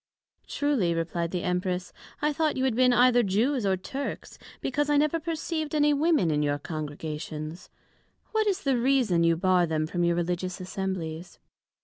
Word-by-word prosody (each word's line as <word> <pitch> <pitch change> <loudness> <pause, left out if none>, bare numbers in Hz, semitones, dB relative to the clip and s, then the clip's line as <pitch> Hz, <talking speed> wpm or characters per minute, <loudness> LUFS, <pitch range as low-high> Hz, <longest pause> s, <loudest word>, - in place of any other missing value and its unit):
Truly, 250 -13 0
replied 170 0 -2
the 180 0 -3
Empress, 180 0 -2 0.3
I 300 0 +2
thought 310 -1 0
you 260 - 0
had 260 -3 +2
been 250 +1 +4
either 245 0 +5
Jews, 225 +4 +1
or 190 -1 +2
Turks, 270 +9 -6 0.2
because 290 +3 -1
I 295 - +4
never 305 +3 +2
perceived 315 -1 -3
any 295 0 +4
Women 290 - +2
in 150 0 +1
your 145 -1 +1
Congregations: 155 +1 -6 0.5
But - - -38
what 435 -1 +2
is 395 -1 0
the 270 -4 +2
reason, 240 -9 +2
you 165 0 +3
bar 180 -1 +3
them 155 -1 0
from 175 +2 -2
your 170 0 +2
religious 180 +2 -2
Assemblies? 185 -3 -5
190 Hz, 170 wpm, -27 LUFS, 170-285 Hz, 0.5 s, either